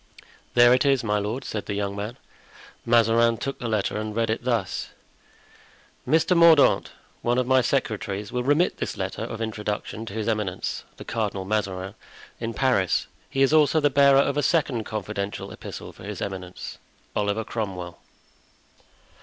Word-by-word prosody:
"There 120 0 +7
it 125 - +3
is, 135 -3 +3
my 105 -2 +1
lord," 110 +6 -3
said 105 - -4
the 100 - -2
young 100 -1 -2
man. 105 +4 -5 0.7
Mazarin 115 0 +4
took 135 +4 -4
the 120 - -3
letter 110 -2 0
and 110 0 -4
read 115 -1 +1
it 115 - -2
thus: 115 -6 -1 1.2
"Mr. 160 +4 +3
Mordaunt, 170 -3 +6 0.3
one 120 +1 +1
of 125 - +2
my 130 +1 +4
secretaries, 105 -6 -2
will 125 0 -1
remit 145 +7 +2
this - - -4
letter - - -4
of 115 - -5
introduction 110 0 -4
to 95 - -7
His 110 -1 -2
Eminence, 105 -5 -2
the - - -10
Cardinal 105 -4 -2
Mazarin, 95 -2 -2 0.5
in 115 0 -4
Paris. 125 -9 +2 0.2
He 135 - +2
is 135 - +3
also 155 0 +5
the 145 -1 +2
bearer 140 0 +6
of 140 +1 +2
a - - +3
second 135 -7 +1
confidential 105 -1 -4
epistle - - -8
for - - -14
his 105 -1 -6
eminence. 95 -2 -6 0.4
"Oliver 105 +2 0
Cromwell." 95 -7 -5
115 Hz, 160 wpm, -25 LUFS, 105-130 Hz, 1.2 s, There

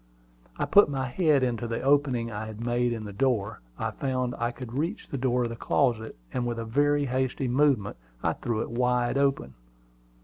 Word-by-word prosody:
I - - 0
put 205 - +6
my 135 -2 -1
head 145 +1 +2
into 120 -2 -1
the 115 0 -3
opening 135 -4 +2
I 105 +1 -5
had 110 +1 -7
made 120 0 +1
in 115 -2 -3
the 100 - -7
door. 115 -3 0 0.2
I - - -2
found 130 -2 -2
I 120 0 +1
could 120 -1 -8
reach 165 - -2
the 140 - -4
door 125 -1 +1
of 120 - -1
the 115 - -5
closet; 115 -2 0 0.2
and 120 -1 -1
with 120 -1 -2
a 115 - -4
very 145 +5 +2
hasty 130 0 -1
movement 125 - +2 0.3
I - - +2
threw 115 -2 -2
it - - -4
wide 125 +1 +1
open. 135 - 0
125 Hz, 200 wpm, -27 LUFS, 115-135 Hz, 0.3 s, put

